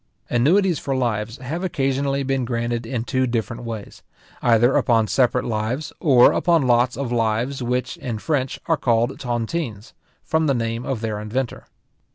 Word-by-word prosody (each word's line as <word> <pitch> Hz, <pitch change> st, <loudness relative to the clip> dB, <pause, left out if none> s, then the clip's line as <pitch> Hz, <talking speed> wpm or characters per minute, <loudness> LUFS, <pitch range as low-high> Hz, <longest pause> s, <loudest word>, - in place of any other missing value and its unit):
Annuities 170 Hz, +8 st, +3 dB
for 135 Hz, -, -2 dB
lives 115 Hz, -2 st, -1 dB
have 155 Hz, +8 st, -5 dB
occasionally 140 Hz, -4 st, 0 dB
been 135 Hz, -1 st, 0 dB
granted 120 Hz, -1 st, -2 dB
in 120 Hz, -1 st, -2 dB
two 130 Hz, +1 st, 0 dB
different 115 Hz, 0 st, -3 dB
ways; 110 Hz, -3 st, -7 dB, 0.4 s
either 120 Hz, +2 st, +4 dB
upon 115 Hz, -4 st, +3 dB
separate 125 Hz, +3 st, +1 dB
lives, 115 Hz, +6 st, -2 dB
or 130 Hz, -7 st, +6 dB
upon 170 Hz, -2 st, +2 dB
lots 120 Hz, 0 st, +3 dB
of 135 Hz, -3 st, -3 dB
lives, 120 Hz, +3 st, 0 dB
which, 125 Hz, +1 st, -2 dB
in 120 Hz, -3 st, -4 dB
French, 135 Hz, +2 st, -1 dB
are 165 Hz, -2 st, +2 dB
called 120 Hz, 0 st, +1 dB
tontines, 120 Hz, -1 st, -3 dB, 0.3 s
from 160 Hz, 0 st, +1 dB
the 140 Hz, -, +2 dB
name 115 Hz, 0 st, -2 dB
of 130 Hz, -5 st, -2 dB
their 110 Hz, -2 st, -2 dB
inventor. 115 Hz, +4 st, -4 dB
125 Hz, 160 wpm, -22 LUFS, 115-135 Hz, 0.4 s, or